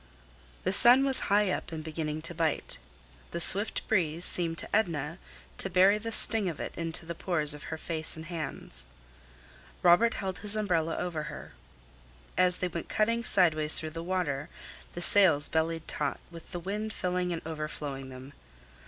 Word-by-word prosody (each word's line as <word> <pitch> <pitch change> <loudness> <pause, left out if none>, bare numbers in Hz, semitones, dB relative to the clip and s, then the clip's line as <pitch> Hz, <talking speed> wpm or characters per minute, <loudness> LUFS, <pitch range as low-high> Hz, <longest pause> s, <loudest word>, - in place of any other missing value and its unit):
The - - -1
sun 250 +3 +7
was 270 -1 0
high 205 -1 +2
up 175 - -5
and 160 -1 -6
beginning 155 -1 -5
to 170 +1 -4
bite. 165 -2 -2 0.5
The - - -5
swift 200 +5 +3
breeze 170 -5 0
seemed 165 -2 -1
to - - -2
Edna 165 -5 -2 0.4
to 195 - +2
bury 190 +3 +4
the 225 +1 -6
sting 220 -3 +6
of 160 - -8
it - - -6
into 165 0 -2
the 170 - -5
pores 160 -4 -1
of 150 - -11
her 160 - -6
face 160 0 -1
and 160 0 -9
hands. 135 - -5 1.0
Robert 185 +7 +4
held 190 -2 -5
his 210 0 +5
umbrella 170 -6 -1
over 175 -3 -4
her. - - -10 0.8
As 180 -1 +2
they 180 - -2
went 170 -2 -7
cutting 230 +2 0
sidewise 155 -7 +3
through 155 -1 -6
the 165 +1 -7
water, 165 -5 -3 0.4
the 175 - -2
sails 165 -9 +7
bellied 160 0 -2
taut, - - -3
with 165 -1 -13
the 175 - -5
wind 210 +4 -5
filling 180 -2 -2
and 165 - -5
overflowing 150 -4 -6
them. 130 +2 -12
170 Hz, 170 wpm, -28 LUFS, 155-190 Hz, 1.0 s, sun